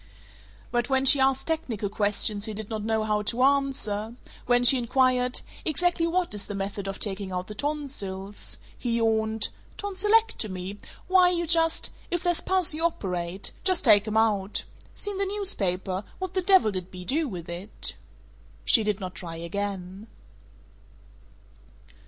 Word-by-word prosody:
But 240 0 0
when 265 0 +2
she 270 +1 +7
asked 270 0 +2
technical 270 -11 -2
questions 205 0 +1
he 220 - -4
did 215 +1 -7
not 215 -1 -3
know 220 0 0
how 210 -1 0
to 235 +4 +1
answer; 265 -6 +1 0.3
when 245 0 +3
she 250 +1 +8
inquired, 250 +1 +1 0.2
"Exactly 335 +1 +1
what 355 -5 0
is 205 -1 -1
the 205 - -5
method 195 0 -4
of 195 - -4
taking 195 -2 -3
out 180 0 -3
the 210 - -8
tonsils?" 205 -8 -4 0.2
he 235 -2 -2
yawned, 220 -1 +1 0.3
"Tonsilectomy? 380 - 0 0.3
Why 365 -1 +5
you 345 -1 0
just 330 0 +2 0.2
If 350 0 -2
there's 350 -2 +2
pus, 375 -4 +3
you 315 +2 -3
operate. 185 - -2
Just 370 -5 +3
take 210 -2 +6
'em 215 0 -1
out. 210 -3 +1 0.3
Seen 410 -2 -1
the 395 - +1
newspaper? 195 - -1
What 375 -1 -5
the 375 - +1
devil 375 - +5
did 185 -2 -5
Bea 180 -1 -8
do 305 - +1
with 180 -8 -7
it?" 175 +5 -4 0.7
She 225 - +5
did 210 -1 -1
not 185 -2 -6
try 170 -1 -7
again. 190 +3 -5
220 Hz, 155 wpm, -26 LUFS, 200-315 Hz, 0.7 s, she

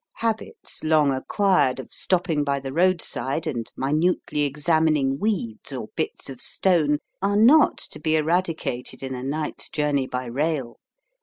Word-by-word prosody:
Habits, 225 -1 -4
long 155 -2 +4
acquired, 140 -1 +2
of 130 - -9
stopping 170 -5 0
by 140 -1 0
the 135 0 -6
roadside 165 -3 0
and 120 -8 -3
minutely 150 +2 0
examining 145 -1 +1
weeds 180 - -2
or - - -5
bits - - -3
of 130 -2 -8
stone, 160 -6 +2 0.2
are 200 +1 +1
not 265 +9 +6
to 150 - -9
be 155 +1 +1
eradicated 160 -6 -1
in 130 0 -4
a 125 - -5
night's 150 +4 -2
journey 145 -3 0
by 125 0 -3
rail. 135 0 -2
150 Hz, 145 wpm, -24 LUFS, 135-175 Hz, 0.2 s, not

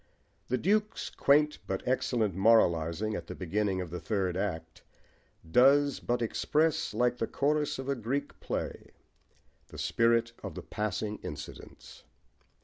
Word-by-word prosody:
The 125 - 0
Duke's 210 - 0
quaint 150 +2 +3
but 95 +3 -3
excellent 120 -5 +1
moralising 95 -1 +3
at 85 -3 -6
the - - -6
beginning 95 +1 -1
of 90 -3 -6
the 90 - -4
third 95 -4 -1
act 80 -5 -4 0.7
does 140 - +5
but 120 0 -1
express, 160 +7 0
like 125 0 +2
the 115 - -1
chorus 150 +1 0
of 135 0 -6
a 140 - +1
Greek 130 +3 -3
play, - - -5 0.7
the - - -12
spirit 115 0 +2
of 100 -5 -7
the - - -7
passing 105 0 -3
incidents. 75 0 -9
115 Hz, 140 wpm, -30 LUFS, 95-140 Hz, 0.7 s, does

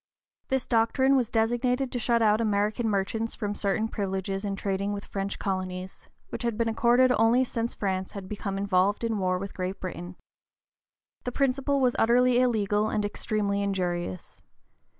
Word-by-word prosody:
This 265 -2 0
doctrine 260 +4 +3
was 245 -4 +1
designed 240 +3 +1
to 245 - -2
shut 235 0 +2
out 215 +1 +4
American 215 +2 +1
merchants 215 +3 -1
from 205 -2 -3
certain 205 +2 0
privileges 195 -2 -3
in 200 -1 -2
trading 200 +1 -2
with 200 0 -5
French 195 0 -4
colonies, 185 -1 -4 0.2
which - - -5
had 235 -3 -1
been 230 0 +1
accorded 240 +3 +4
only 230 +3 +4
since 235 -2 -3
France 190 -2 -2
had 195 -2 -7
become 200 -1 -4
involved 195 +2 +1
in 225 -2 0
war 185 -1 +1
with 195 +2 -6
Great 185 +1 -4
Britain. 180 -1 -6 1.1
The 250 - -3
principle 275 +2 +1
was 250 -2 +2
utterly 245 +2 +4
illegal 215 -4 +2
and 210 -1 0
extremely 205 -1 -1
injurious. 175 - -3
210 Hz, 160 wpm, -27 LUFS, 195-235 Hz, 1.1 s, out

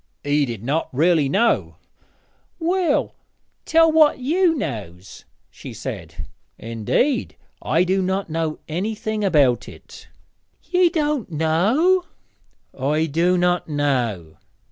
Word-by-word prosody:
'He 145 0 +1
did 115 -3 -6
not 145 +6 -1
really 155 +1 +2
know.' 230 +10 +1 0.8
'Well, 345 -2 0 0.5
tell 325 0 +4
what 310 -1 +4
you 325 +6 +1
knows,' 100 - -7 0.3
she - - -10
said. 75 - -7 0.3
'Indeed, 115 - -1 0.3
I 165 +3 +1
do 190 +1 +1
not 190 +1 -1
know 160 -1 -2
anything 215 +5 -3
about 145 -10 +2
it.' - - -14 0.6
'Ye 360 -1 +2
doän't 300 - -1
know!' 205 - +2 0.7
'I 150 +4 0
do 175 +4 +2
not 180 0 +1
know.' 120 - -1
175 Hz, 110 wpm, -21 LUFS, -, 0.8 s, tell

